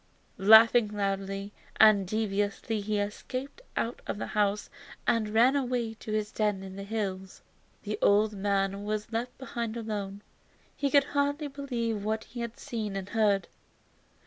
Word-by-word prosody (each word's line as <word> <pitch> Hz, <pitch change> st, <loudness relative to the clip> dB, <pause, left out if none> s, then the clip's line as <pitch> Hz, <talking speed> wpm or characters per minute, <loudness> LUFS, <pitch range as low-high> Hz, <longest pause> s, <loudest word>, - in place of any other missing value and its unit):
Laughing 220 Hz, +3 st, +7 dB
loudly 195 Hz, 0 st, -3 dB, 0.3 s
and 210 Hz, -3 st, +6 dB
derisively 205 Hz, +1 st, -1 dB
he 210 Hz, +1 st, -1 dB
escaped 255 Hz, -, -5 dB, 0.2 s
out 235 Hz, +2 st, -2 dB
of -, -, -3 dB
the -, -, -3 dB
house 205 Hz, 0 st, 0 dB, 0.4 s
and 220 Hz, -2 st, +2 dB
ran 235 Hz, +5 st, +4 dB
away 245 Hz, -4 st, -1 dB
to 220 Hz, 0 st, -8 dB
his 215 Hz, 0 st, -1 dB
den 210 Hz, -3 st, 0 dB
in 190 Hz, 0 st, -8 dB
the 195 Hz, -, -6 dB
hills. 195 Hz, -2 st, -4 dB, 0.4 s
The 210 Hz, +1 st, -4 dB
old 210 Hz, +1 st, +4 dB
man 195 Hz, 0 st, 0 dB
was 215 Hz, +1 st, -3 dB
left 240 Hz, +2 st, -3 dB
behind 235 Hz, -3 st, -4 dB
alone. 205 Hz, -3 st, -4 dB, 0.5 s
He 280 Hz, -, 0 dB
could 280 Hz, +1 st, +5 dB
hardly 285 Hz, +1 st, -1 dB
believe 240 Hz, -6 st, -3 dB
what 220 Hz, +1 st, -1 dB
he 240 Hz, -, -10 dB
had 235 Hz, -1 st, -5 dB
seen 215 Hz, -4 st, -4 dB
and 195 Hz, 0 st, -4 dB
heard. 205 Hz, -3 st, +2 dB
215 Hz, 150 wpm, -29 LUFS, 200-235 Hz, 0.5 s, Laughing